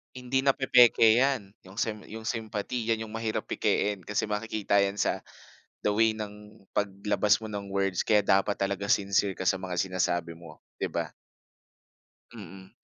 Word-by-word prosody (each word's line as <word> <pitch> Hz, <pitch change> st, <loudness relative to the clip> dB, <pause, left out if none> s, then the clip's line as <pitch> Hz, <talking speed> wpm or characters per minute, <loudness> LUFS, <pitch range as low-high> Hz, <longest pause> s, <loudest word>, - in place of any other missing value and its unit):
Hindi 130 Hz, +2 st, -1 dB
napepeke 120 Hz, -4 st, +5 dB
yan, 130 Hz, -7 st, +1 dB, 0.2 s
yung 95 Hz, -, -13 dB
sem 110 Hz, 0 st, -2 dB
yung 110 Hz, +1 st, -8 dB
sympathy 110 Hz, +1 st, -3 dB
yan 115 Hz, -1 st, 0 dB
yung 110 Hz, -, -8 dB
mahirap 110 Hz, 0 st, -3 dB
pekein, 105 Hz, -1 st, 0 dB
kasi 105 Hz, +1 st, -1 dB
makikita 105 Hz, -1 st, 0 dB
yan 100 Hz, 0 st, +2 dB
sa 105 Hz, -, 0 dB, 0.6 s
the -, -, -2 dB
way 110 Hz, 0 st, +4 dB
ng 105 Hz, -1 st, -9 dB, 0.2 s
paglabas 100 Hz, +1 st, +1 dB
mo 110 Hz, -, -7 dB
ng 100 Hz, -2 st, -6 dB
words 95 Hz, -2 st, 0 dB
kaya 105 Hz, -1 st, +4 dB
dapat 100 Hz, 0 st, +2 dB
talaga 100 Hz, +1 st, -1 dB
sincere 100 Hz, 0 st, +2 dB
ka 95 Hz, 0 st, -4 dB
sa 95 Hz, -, +4 dB
mga 90 Hz, -2 st, -4 dB
sinasabi 85 Hz, -2 st, -1 dB
mo, 85 Hz, 0 st, -13 dB, 0.2 s
di -, -, -3 dB
ba? -, -, -2 dB, 1.3 s
Mm. 95 Hz, -3 st, -11 dB
105 Hz, 160 wpm, -28 LUFS, 95-110 Hz, 1.3 s, napepeke